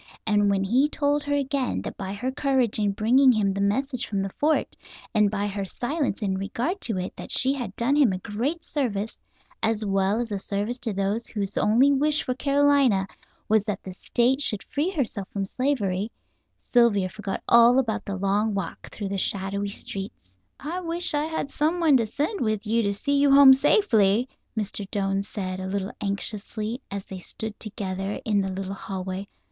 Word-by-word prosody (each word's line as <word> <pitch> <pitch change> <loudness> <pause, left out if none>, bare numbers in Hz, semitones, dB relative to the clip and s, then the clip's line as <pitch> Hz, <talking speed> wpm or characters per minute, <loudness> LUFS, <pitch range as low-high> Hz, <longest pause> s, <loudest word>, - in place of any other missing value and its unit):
And 205 -2 +3
when 195 -1 +1
he 255 +9 +3
told 290 -1 +1
her 285 0 0
again 275 -2 -1
that - - -6
by 190 -1 -5
her 250 +6 -3
courage 265 -5 +1
in 205 -1 +2
bringing 250 +6 +5
him 205 -4 +1
the 200 - -2
message 255 +5 0
from 200 -2 -1
the 195 - -4
fort, 305 +1 +1 0.4
and 210 -2 +4
by 205 0 -2
her 200 -1 -3
silence 250 - -2
in 190 -2 -1
regard 245 - -2
to 220 -5 +1
it, 185 0 -4
that - - -9
she 265 +1 +3
had 255 -4 -5
done 250 +5 +1
him 285 -8 +5
a 185 - -2
great 245 - -3
service, 225 -7 -2 0.4
as 220 -1 0
well 195 +2 +1
as 235 -2 -3
a 200 - -2
service 205 +6 -3
to 235 -3 -2
those 200 +4 -1
whose 200 -2 -4
only 245 +7 +4
wish 295 +2 +2
for - - -2
South 250 - -4
Carolina 280 -8 +3 0.4
was 215 -1 +3
that 210 -3 -3
the 190 - -7
State 245 +8 +1
should 210 -7 -1
free 295 +5 -1
herself 245 - -3
from 195 -1 -3
slavery, 210 -4 -1 0.5
Sylvia 230 -6 +3
forgot 205 0 -5
all 235 +1 +7
about 225 -4 0
the 200 - -4
long 200 +2 0
walk 195 - -5
through 205 -2 -5
the 195 0 -2
shadowy 200 +1 -1
streets. 195 - -7 0.3
"I 330 +6 -4
wish 340 0 -2
I 295 +1 +1
had 320 -3 -3
someone 320 -1 +2
to 230 -3 0
send 300 - -2
with 215 -2 -1
you 230 +2 +2
to 200 -2 0
see 280 +8 0
you 285 0 +4
home 275 -1 +9
safely," 245 - +3 0.3
Mr. 205 -2 -3
Doane 195 -1 0
said, 190 -2 -5
a 190 - -4
little 195 0 -2
anxiously, 210 +3 -2
as 200 -1 -5
they 190 - -8
stood 215 +4 -6
together 195 -2 -4
in 210 -2 +2
the 190 - -2
little 190 +1 -4
hallway. 190 0 -5
215 Hz, 195 wpm, -25 LUFS, 200-270 Hz, 0.5 s, home